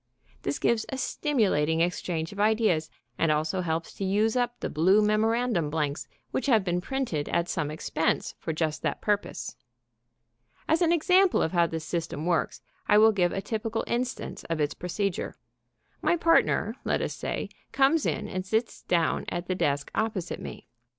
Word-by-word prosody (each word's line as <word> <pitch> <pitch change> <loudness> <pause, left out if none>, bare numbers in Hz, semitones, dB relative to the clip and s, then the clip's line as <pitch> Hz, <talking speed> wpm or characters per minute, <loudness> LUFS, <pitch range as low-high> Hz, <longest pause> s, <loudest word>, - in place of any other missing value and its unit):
This - - -2
gives 230 -2 +1
a 265 - -3
stimulating 190 - +1
exchange 170 -2 -1
of 200 - -9
ideas, 210 -7 +2 0.3
and 165 - +3
also 155 +5 0
helps 165 -1 -2
to - - -5
use 210 +4 +2
up 245 -1 0
the - - -2
blue 185 +7 +4
memorandum 215 -4 +1
blanks 150 0 -2 0.2
which 265 - -1
have 225 -6 +4
been 180 -1 0
printed 235 - -2
at 170 0 +1
some 150 -5 -1
expense 160 +1 -1
for - - -3
just 155 -1 -1
that - - -1
purpose. 205 -1 -2 1.1
As 320 +3 +2
an 335 -1 +4
example 360 +3 +4
of 160 - -1
how 170 -2 +3
this 160 -1 -5
system 165 -2 -3
works, 175 -1 0 0.2
I 210 - +5
will 220 +1 +7
give 180 -4 +2
a 195 - -2
typical 225 0 -2
instance 250 +2 -3
of 165 -1 -2
its 145 -1 +1
procedure. 180 +1 -3 0.7
My 345 - +2
partner, 330 0 +3
let - - 0
us - - -2
say, - - -4 0.2
comes 275 +3 +3
in - - -2
and 185 -1 -3
sits 220 +4 -1
down 170 -2 +1
at 175 0 -3
the 185 - -1
desk 145 -5 -1
opposite 205 -6 -2
me. - - -8
190 Hz, 170 wpm, -27 LUFS, 165-225 Hz, 1.1 s, will